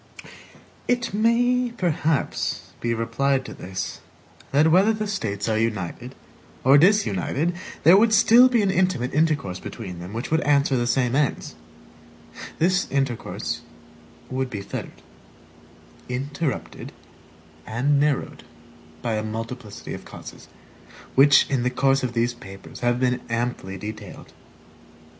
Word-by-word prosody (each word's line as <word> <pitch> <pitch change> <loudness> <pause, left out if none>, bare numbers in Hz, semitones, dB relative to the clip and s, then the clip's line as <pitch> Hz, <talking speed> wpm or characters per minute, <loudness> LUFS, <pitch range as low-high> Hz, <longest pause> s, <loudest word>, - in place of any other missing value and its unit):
It 245 -3 0
may 245 +3 +2
perhaps 160 -4 -1
be 120 - -1
replied 130 +4 0
to - - -8
this, 95 +1 -6 0.5
that 150 +3 +4
whether 195 +6 +5
the 215 0 -3
States 110 - -3
are 110 -1 +1
united 115 +3 -3 0.5
or 135 +3 +7
disunited, 165 - +2 0.3
there 170 +5 +8
would 220 +3 +5
still 240 +3 +7
be 235 -4 +2
an 195 - +2
intimate 180 -9 0
intercourse 145 - 0
between 95 -7 -8
them 90 +2 -8
which 115 +6 -5
would 160 0 +3
answer 140 -1 +2
the 120 -1 0
same 125 -1 +1
ends; 145 - 0 1.0
this 180 +2 +1
intercourse 135 -4 -2 0.7
would 130 0 -2
be 105 -5 -5
fettered, - - -7 1.1
interrupted, 140 +4 -4 0.7
and 140 +6 +1
narrowed 145 -1 -1 0.6
by 110 -2 -1
a 110 - -2
multiplicity 115 0 -6
of - - -8
causes, - - -11 0.7
which 140 +1 +6
in 135 -3 0
the 125 - +1
course 135 +1 +2
of 125 -2 -3
these 120 +1 +1
papers 95 -5 -12
have 120 0 +1
been 125 -1 +1
amply 115 -5 -3
detailed. 105 0 -9
130 Hz, 130 wpm, -24 LUFS, 115-165 Hz, 1.1 s, there